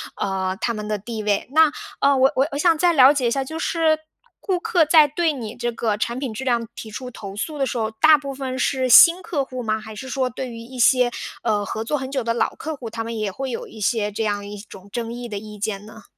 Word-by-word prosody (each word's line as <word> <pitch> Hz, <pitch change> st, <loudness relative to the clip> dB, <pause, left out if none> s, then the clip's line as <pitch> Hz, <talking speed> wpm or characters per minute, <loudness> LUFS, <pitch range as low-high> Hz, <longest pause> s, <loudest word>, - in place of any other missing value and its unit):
呃， 190 Hz, -1 st, -2 dB
他 235 Hz, -, 0 dB
们 210 Hz, -1 st, -5 dB
的 215 Hz, -, -1 dB
地 215 Hz, +2 st, -6 dB
位。 205 Hz, +3 st, 0 dB
那， 315 Hz, +1 st, +6 dB, 0.3 s
呃， 280 Hz, 0 st, +4 dB
我 265 Hz, +1 st, +4 dB
我 270 Hz, -, +3 dB
我 -, -, -2 dB
想 330 Hz, +1 st, +3 dB
再 345 Hz, +1 st, +3 dB
了 265 Hz, -2 st, +8 dB
解 270 Hz, -5 st, 0 dB
一 -, -, 0 dB
下， 270 Hz, +1 st, 0 dB
就 320 Hz, +4 st, -6 dB
是 320 Hz, -2 st, +1 dB, 0.4 s
顾 375 Hz, -3 st, -1 dB
客 340 Hz, -3 st, +3 dB
在 300 Hz, -1 st, +6 dB
对 325 Hz, +1 st, +1 dB
你 230 Hz, -6 st, -6 dB
这 240 Hz, 0 st, -3 dB
个 220 Hz, -2 st, -1 dB
产 235 Hz, +3 st, -2 dB
品 260 Hz, -4 st, -4 dB
质 260 Hz, +5 st, -6 dB
量 235 Hz, -2 st, +1 dB
提 220 Hz, -, -9 dB
出 250 Hz, +4 st, -7 dB
投 200 Hz, -4 st, -9 dB
诉 300 Hz, +9 st, -4 dB
的 275 Hz, -, +1 dB
时 250 Hz, -, -3 dB
候， 220 Hz, -1 st, -1 dB
大 305 Hz, +8 st, +5 dB
部 280 Hz, -2 st, -6 dB
分 260 Hz, -1 st, -4 dB
是 260 Hz, 0 st, 0 dB
新 340 Hz, +8 st, +8 dB
客 285 Hz, -5 st, -2 dB
户 255 Hz, -1 st, -6 dB
吗？ 220 Hz, -2 st, -1 dB
还 220 Hz, 0 st, -9 dB
是 260 Hz, +5 st, -8 dB
说 260 Hz, -1 st, -1 dB
对 250 Hz, +1 st, -6 dB
于 230 Hz, -, -8 dB
一 250 Hz, +2 st, -10 dB
些， 250 Hz, 0 st, +4 dB, 0.3 s
呃， 210 Hz, -3 st, 0 dB
合 220 Hz, -, -4 dB
作 295 Hz, +6 st, -1 dB
很 265 Hz, -1 st, -5 dB
久 270 Hz, -2 st, -2 dB
的 230 Hz, 0 st, 0 dB
老 235 Hz, -, 0 dB
客 310 Hz, -1 st, -5 dB
户， 235 Hz, -3 st, -7 dB
他 225 Hz, 0 st, -4 dB
们 230 Hz, 0 st, -5 dB
也 215 Hz, -2 st, -1 dB
会 265 Hz, +7 st, -5 dB
有 230 Hz, -, -5 dB
一 220 Hz, -, -12 dB
些 210 Hz, 0 st, +1 dB
这 210 Hz, +2 st, -3 dB
样 205 Hz, -1 st, -2 dB
一 205 Hz, 0 st, -7 dB
种 200 Hz, -1 st, -12 dB
争 230 Hz, +2 st, -4 dB
议 240 Hz, 0 st, -6 dB
的 205 Hz, -3 st, -5 dB
意 210 Hz, 0 st, -9 dB
见 205 Hz, -1 st, -3 dB
呢？ 215 Hz, 0 st, -13 dB
240 Hz, 290 characters per minute, -22 LUFS, 215-275 Hz, 0.4 s, 了